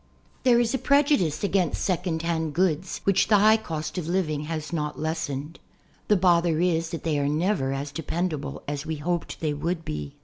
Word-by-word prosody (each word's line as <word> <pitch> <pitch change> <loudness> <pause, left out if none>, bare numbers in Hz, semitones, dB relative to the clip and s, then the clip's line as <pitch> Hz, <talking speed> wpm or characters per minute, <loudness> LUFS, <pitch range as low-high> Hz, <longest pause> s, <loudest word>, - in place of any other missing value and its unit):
TIIIlRE 240 -2 +6
is 230 +1 0
a 265 - 0
prejudice 280 - +2
against 190 -5 +1
"second 175 -3 -1
hand" 160 -2 -1
goods 180 0 0
which 195 -1 +3
the 210 - +5
high 215 +2 +6
cost 160 -4 -4
of 170 - -5
Hving 155 -4 -1
has 155 0 -4
not 150 -2 -2
lessened. 155 -1 -3 0.5
The 210 - +4
bother 170 -3 +3
is 165 -2 +1
that 165 - -5
they 155 -3 0
are 140 0 +1
never 155 -2 0
as 140 +1 -3
dependable 160 0 -3
as 145 0 -3
we 160 0 -3
hoped 170 +3 -3
they 155 -2 0
would 165 +3 -3
be. 75 -1 -5
165 Hz, 190 wpm, -26 LUFS, 150-185 Hz, 0.5 s, TIIIlRE